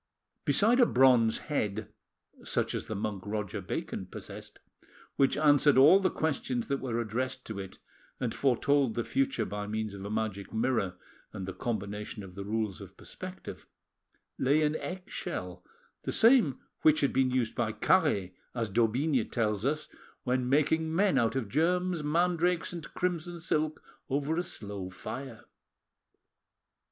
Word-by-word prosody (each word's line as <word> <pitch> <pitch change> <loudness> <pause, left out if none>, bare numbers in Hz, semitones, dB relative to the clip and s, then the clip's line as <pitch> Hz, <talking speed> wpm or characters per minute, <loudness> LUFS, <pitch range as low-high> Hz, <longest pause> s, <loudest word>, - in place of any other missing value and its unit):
Beside 215 - +4
a 245 - +7
bronze 125 -3 +5
head, 105 -7 -3 0.5
such - - 0
as - - -3
the 110 - -4
monk 100 -1 -3
Roger 105 -2 -3
Bacon - - -4
possessed, - - -9 0.6
which 135 0 +3
answered 145 -2 +5
all 150 +9 +8
the 190 -1 +2
questions 135 -8 -2
that 140 0 0
were 120 -3 -2
addressed 125 +3 -3
to 110 -3 -5
it 95 -1 -8 0.4
and 125 -3 -1
foretold 135 -1 +2
the 120 - 0
future 270 - 0
by 105 0 -4
means 110 -1 -3
of 100 -1 -8
a 100 - -5
magic 110 -2 -3
mirror 110 -6 0 0.4
and 95 - -5
the 95 - -4
combination 105 -1 -4
of 95 -2 -10
the 100 +1 -6
rules 105 -1 -2
of - - -12
perspective, - - -8 0.7
lay 145 +4 +3
an 150 0 +1
eggshell, 180 0 -5 0.4
the - - -3
same 225 - +5 0.2
which 155 -1 +5
had 140 - +2
been 130 0 +3
used 125 -3 0
by - - 0
Caret, 95 -2 +2 0.2
as 115 -3 -1
d'Aubigne 120 +5 +2
tells 105 0 0
us, 150 +1 -1 0.4
when 125 0 0
making 160 +3 +2
men 195 +1 +3
out 115 0 +1
of 130 -5 -1
germs, 175 - +1
mandrakes, 175 +3 +1
and 170 -3 -7
crimson 175 -1 -2
silk, 155 -1 -1 0.3
over 145 +3 0
a 175 - +1
slow 100 - -6
fire. 115 +4 -7
130 Hz, 150 wpm, -30 LUFS, 110-155 Hz, 0.7 s, all